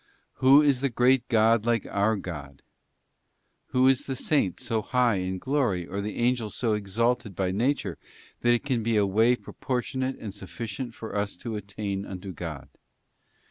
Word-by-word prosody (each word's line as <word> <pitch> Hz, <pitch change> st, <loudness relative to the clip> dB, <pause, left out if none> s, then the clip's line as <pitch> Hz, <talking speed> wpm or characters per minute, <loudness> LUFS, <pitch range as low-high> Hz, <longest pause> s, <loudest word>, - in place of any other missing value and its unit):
' -, -, -45 dB
Who 135 Hz, +3 st, +7 dB
is 140 Hz, -4 st, +3 dB
the 140 Hz, -, +1 dB
great 125 Hz, +2 st, +3 dB
God 115 Hz, -1 st, +3 dB
like 115 Hz, -2 st, +1 dB
our 100 Hz, +3 st, +1 dB
God?' 75 Hz, -8 st, -7 dB, 1.0 s
Who 130 Hz, +1 st, +3 dB
is 135 Hz, -1 st, +3 dB
the 135 Hz, -, -2 dB
Saint 130 Hz, -, +1 dB
so 110 Hz, -1 st, -1 dB
high 125 Hz, -2 st, +2 dB
in 95 Hz, 0 st, -2 dB
glory, 120 Hz, -7 st, 0 dB
or 100 Hz, +3 st, -4 dB
the 105 Hz, +1 st, -4 dB
Angel 120 Hz, -2 st, +1 dB
so 115 Hz, +1 st, -1 dB
exalted 105 Hz, +1 st, 0 dB
by 95 Hz, 0 st, 0 dB
nature, 125 Hz, +9 st, -1 dB, 0.4 s
that 120 Hz, 0 st, +2 dB
can 130 Hz, -5 st, 0 dB
be 115 Hz, 0 st, +1 dB
a 105 Hz, -, +4 dB
way 110 Hz, +5 st, +4 dB
proportionate 130 Hz, +1 st, -3 dB
and 105 Hz, -4 st, -7 dB
sufficient 115 Hz, +4 st, -6 dB
for 110 Hz, -, -7 dB
us 100 Hz, -2 st, -2 dB
to 115 Hz, +3 st, -5 dB
attain 100 Hz, -1 st, -4 dB
unto 95 Hz, 0 st, -7 dB
God? 75 Hz, -4 st, -6 dB
110 Hz, 170 wpm, -27 LUFS, 100-125 Hz, 1.0 s, Who